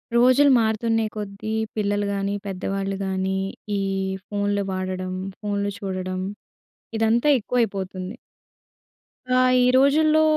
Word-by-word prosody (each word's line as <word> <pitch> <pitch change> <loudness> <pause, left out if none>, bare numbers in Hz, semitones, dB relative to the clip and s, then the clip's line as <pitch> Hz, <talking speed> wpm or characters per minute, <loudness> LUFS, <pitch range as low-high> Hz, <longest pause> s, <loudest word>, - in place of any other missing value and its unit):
రోజులు 255 +4 +6
మారుతున్నే 225 0 +1
కొద్దీ 205 0 -5 0.2
పిల్లలు 205 -1 0
కానీ, 200 0 -1
పెద్దవాళ్ళు 195 +1 -2
కానీ, 190 0 -1 0.4
ఈ - - 0 0.5
ఫోన్లు 205 0 0
వాడడం, 185 0 -3 0.3
ఫోన్లు 205 -1 -1
చూడడం, 185 -2 -3 0.8
ఇదంతా 225 +4 +2
ఎక్కువైపోతుంది. 195 -4 -2 1.2
ఆ! 255 0 +5 0.2
ఈ - - +4
రోజుల్లో 305 +4 +5
205 Hz, 100 wpm, -23 LUFS, 190-225 Hz, 1.2 s, రోజులు